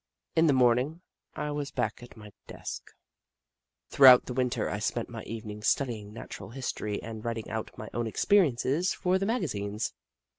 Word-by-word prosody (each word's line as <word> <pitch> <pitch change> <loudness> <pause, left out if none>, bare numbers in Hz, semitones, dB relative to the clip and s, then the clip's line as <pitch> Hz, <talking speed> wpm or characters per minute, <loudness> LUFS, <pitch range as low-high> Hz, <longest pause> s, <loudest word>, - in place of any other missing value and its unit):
In 160 0 +5
the 145 - +5
morning 130 +6 +3 0.3
I 150 0 -3
was 145 -1 -3
back 120 -2 -2
at 120 -1 -13
my 105 -1 -11 0.2
desk. - - -7 1.0
Throughout 130 -2 +8
the 125 - -5
Winter 125 -1 0
I - - -3
spent - - -2
my - - -6
evenings 105 -1 -5
studying 110 -7 0
Natural 115 - -8
History 110 -4 -3
and 110 -1 -7
writing 115 -2 -4
out 110 0 -3
my - - -7
own 120 -1 -1
experiences 155 - +2
for 185 +1 +1
the 195 - -1
magazines. 110 - -2
125 Hz, 160 wpm, -29 LUFS, 110-145 Hz, 1.0 s, Throughout